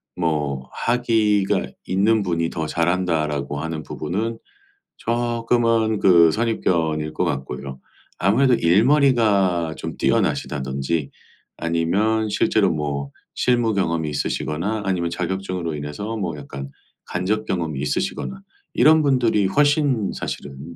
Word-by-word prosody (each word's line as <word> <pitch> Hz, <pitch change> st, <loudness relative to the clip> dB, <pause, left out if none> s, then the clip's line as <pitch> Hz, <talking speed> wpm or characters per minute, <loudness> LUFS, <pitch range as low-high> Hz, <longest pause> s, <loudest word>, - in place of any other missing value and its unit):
뭐 75 Hz, -6 st, -2 dB
'학위가 110 Hz, -4 st, +1 dB, 0.2 s
있는 105 Hz, +4 st, +2 dB
분이 85 Hz, -3 st, -1 dB
더 80 Hz, -1 st, -3 dB
잘한다.'라고 80 Hz, -5 st, 0 dB
하는 80 Hz, 0 st, -4 dB
부분은 110 Hz, +12 st, -3 dB, 0.6 s
쪼끔은 115 Hz, -2 st, +1 dB
그 85 Hz, -4 st, +6 dB
선입견일 80 Hz, -9 st, 0 dB
것 -, -, -1 dB
같고요. 65 Hz, 0 st, -4 dB, 0.4 s
아무래도 120 Hz, +7 st, +4 dB
일머리가 100 Hz, -, +3 dB
좀 -, -, -6 dB
뛰어나시다든지 70 Hz, +2 st, -1 dB, 0.5 s
아니면 100 Hz, +7 st, +1 dB
실제로 -, -, +2 dB
뭐 70 Hz, -2 st, -3 dB, 0.2 s
실무 120 Hz, -3 st, +2 dB
경험이 85 Hz, -5 st, 0 dB
있으시거나 85 Hz, +8 st, -2 dB
아니면 90 Hz, -3 st, 0 dB
자격증으로 90 Hz, -2 st, -3 dB
인해서 75 Hz, +10 st, -5 dB
뭐 85 Hz, -7 st, -3 dB
약간 70 Hz, -1 st, -8 dB, 0.4 s
간접 105 Hz, +5 st, -1 dB
경험이 80 Hz, -6 st, -2 dB
있으시거나 65 Hz, -2 st, -2 dB, 0.3 s
이런 160 Hz, +1 st, +5 dB
분들이 120 Hz, -7 st, +2 dB
훨씬 145 Hz, -3 st, +2 dB
사실은 70 Hz, +4 st, -7 dB
90 Hz, 285 characters per minute, -22 LUFS, 75-110 Hz, 0.6 s, 그